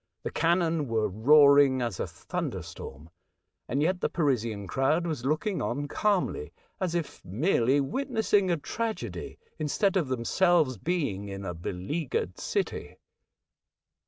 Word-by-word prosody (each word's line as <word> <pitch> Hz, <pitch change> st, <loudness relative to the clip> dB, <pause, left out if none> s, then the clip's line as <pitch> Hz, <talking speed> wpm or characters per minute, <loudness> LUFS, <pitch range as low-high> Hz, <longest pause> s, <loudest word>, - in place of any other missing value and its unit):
The -, -, -3 dB
cannon 165 Hz, -3 st, +1 dB
were 110 Hz, -2 st, +1 dB
roaring 140 Hz, +5 st, +6 dB
as 115 Hz, -6 st, -3 dB
a -, -, -1 dB
thunderstorm, 75 Hz, +5 st, -6 dB, 0.6 s
and 140 Hz, +4 st, 0 dB
yet 180 Hz, +3 st, 0 dB
the -, -, +1 dB
Parisian 115 Hz, -, 0 dB
crowd 135 Hz, -, +1 dB
was 155 Hz, -7 st, -3 dB
looking 155 Hz, +7 st, 0 dB
on 145 Hz, +4 st, -2 dB
calmly, 210 Hz, -, 0 dB, 0.3 s
as 180 Hz, -3 st, -1 dB
if 170 Hz, -3 st, -4 dB
merely 130 Hz, -, +2 dB
witnessing 220 Hz, -, +1 dB
a 170 Hz, -, +2 dB
tragedy, 225 Hz, +8 st, -4 dB, 0.2 s
instead 180 Hz, +6 st, +1 dB
of 165 Hz, -7 st, +1 dB
themselves 130 Hz, +3 st, +2 dB
being 140 Hz, -, -2 dB
in 95 Hz, 0 st, -6 dB
a 90 Hz, -, -3 dB
beleaguered 90 Hz, -, -3 dB
city. -, -, -3 dB
145 Hz, 130 wpm, -28 LUFS, 115-175 Hz, 0.6 s, roaring